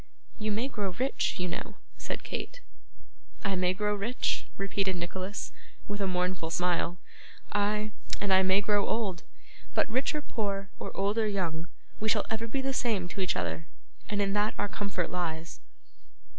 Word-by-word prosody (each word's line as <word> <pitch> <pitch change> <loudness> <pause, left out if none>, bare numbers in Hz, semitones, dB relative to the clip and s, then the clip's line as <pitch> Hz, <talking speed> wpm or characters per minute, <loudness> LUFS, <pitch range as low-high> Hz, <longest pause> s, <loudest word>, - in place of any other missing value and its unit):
'You 215 0 +1
may 225 +5 +1
grow 205 -8 -1
rich, 260 0 +1
you 180 - +1
know,' 170 - -4 0.2
said - - -4
Kate. - - -4 0.8
'I 200 -2 +2
may 180 0 +4
grow 210 +1 +2
rich!' 210 +5 0
repeated 195 -1 +1
Nicholas, 185 +3 -3 0.4
with 205 0 -2
a 195 - +2
mournful 180 -2 +1
smile, 175 0 +2 0.5
'ay, 210 +1 +2 0.3
and 200 -2 +3
I 190 - +8
may 190 +1 +5
grow 205 0 +3
old! 200 -6 0 0.5
But - - +4
rich 260 +6 +2
or 300 - -1
poor, 200 -5 -1
or - - -3
old 200 +3 +2
or 220 - +3
young, 170 -5 0 0.3
we 220 - +1
shall 215 -1 +4
ever 225 +1 0
be 265 +4 -1
the 270 0 +1
same 220 -8 +2
to 195 - -3
each 185 - +2
other, 160 - -1 0.4
and 205 -1 +2
in 195 0 +1
that 210 +1 +2
our 205 - +1
comfort 195 -4 -1
lies. 165 -2 -2
200 Hz, 170 wpm, -31 LUFS, 180-215 Hz, 0.8 s, I